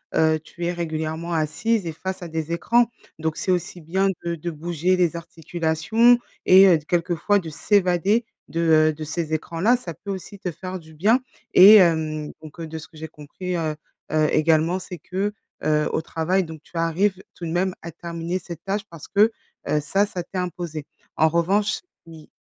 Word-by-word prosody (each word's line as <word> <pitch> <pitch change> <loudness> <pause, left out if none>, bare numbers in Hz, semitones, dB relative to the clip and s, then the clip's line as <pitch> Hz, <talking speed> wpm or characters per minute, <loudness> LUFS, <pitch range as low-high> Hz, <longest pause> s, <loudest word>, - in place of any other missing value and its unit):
heu, 160 0 +3
tu 170 +2 -7
es 175 - +1
régulièrement 160 0 -3
assise 175 +7 0
et 165 - -2
face 185 +4 -5
à 170 - -6
des 160 +1 -3
écrans, 235 +7 +3 0.3
donc 160 0 -1
c'est 185 - -1
aussi 175 0 -2
bien 190 +5 0 0.2
de 170 0 -2
de 170 +1 -5
bouger 170 +3 0
les 175 -2 +1
articulations 170 - +2 0.3
et 190 +1 +8
heu, 170 - +6
de 150 - -12
quelquefois 175 +4 +1
de 165 -3 -7
s'évader 190 +6 +2 0.2
de, 165 - -2
heu, 155 -1 +4
de 155 +1 -7
ces 160 +1 -3
écrans-là, 170 +9 +1
ça 180 -9 -6
peut 200 +4 -7
aussi 195 +1 -7
te 180 - -3
faire 185 +3 -6
du 160 -1 -16
bien. 215 +10 +3 0.3
Et 200 +4 +10
hem, 160 -5 +3
donc, 155 +2 -12
heu, 160 - -5
de 160 - -6
ce 160 - -9
que 155 - -18
j'ai 160 - -6
compris, 165 +5 -6
heu, 155 -2 -2 0.4
heu, 155 -1 +3
également, 160 +3 +2
c'est 180 -1 -8
que, 190 +5 -3 0.3
heu, 150 0 +2
au - - +1
travail, 175 +4 0
donc, 160 -2 -9
tu - - -22
arrives 180 +4 +1
tout 175 - -7
de 160 - -3
même 180 +2 0
à 170 - -6
terminer 170 +2 -4
cette 170 -3 -9
tâche 200 +1 -1
parce 165 -3 -11
que, 210 +3 +4 0.4
heu, 150 - +2
ça, 195 +7 +1
ça 180 -3 -5
t'est 185 - -5
imposé. 170 -4 -4 0.3
En 160 0 +4
revanche 195 +6 +1 0.3
oui, 160 -2 -13
170 Hz, 200 wpm, -23 LUFS, 160-185 Hz, 0.4 s, Et